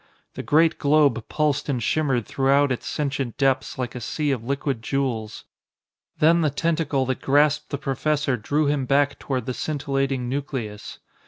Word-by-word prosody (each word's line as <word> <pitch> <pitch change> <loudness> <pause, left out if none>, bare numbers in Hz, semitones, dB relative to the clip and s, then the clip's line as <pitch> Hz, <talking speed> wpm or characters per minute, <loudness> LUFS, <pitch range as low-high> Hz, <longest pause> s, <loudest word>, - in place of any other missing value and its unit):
The - - -5
great 160 +2 +3
globe 140 -6 +3
pulsed 150 -2 0
and 135 - +1
shimmered 130 -1 0
throughout 140 +1 +2
its 125 - -3
sentient 140 -4 -2
depths 135 -2 +1
like 125 -3 -3
a 125 - -6
sea 150 +5 -1
of 125 -4 -2
liquid 140 -1 -2
jewels. 115 -4 -2 0.7
Then 165 +2 +4
the 155 - +2
tentacle 155 -2 0
that 130 0 -3
grasped 150 +2 +2
the 140 - -2
professor 145 0 0
drew 145 +7 0
him 140 -2 0
back 140 +1 +2
toward 130 -4 -3
the 130 - -3
scintillating 135 -3 -2
nucleus. 125 -6 -5
140 Hz, 160 wpm, -23 LUFS, 130-150 Hz, 0.7 s, Then